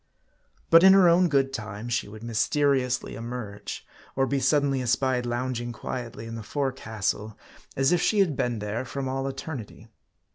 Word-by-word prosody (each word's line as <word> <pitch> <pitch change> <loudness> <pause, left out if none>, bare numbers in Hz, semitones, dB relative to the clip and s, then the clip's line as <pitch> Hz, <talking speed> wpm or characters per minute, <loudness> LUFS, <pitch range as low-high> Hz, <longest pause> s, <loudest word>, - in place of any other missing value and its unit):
But 165 - +9
in 190 0 +9
her 195 -2 +6
own 175 +1 +5
good 135 -2 +2
time, 105 -1 -6
she 120 -2 -1
would 110 +2 -11
mysteriously 125 +3 +1
emerge; 115 -3 -6 0.3
or 135 - +2
be 140 +1 0
suddenly 135 0 +2
espied 125 0 +1
lounging 120 0 -2
quietly 120 -1 -6
in 115 - -7
the 115 - -5
forecastle, 110 -5 -3 0.4
as 135 +3 +3
if 175 -2 +3
she 215 - +2
had 185 -8 +3
been 120 -3 -1
there 105 +3 -3
from 135 +1 -4
all 135 +1 -2
eternity. 135 -6 -7
130 Hz, 160 wpm, -26 LUFS, 115-140 Hz, 0.4 s, But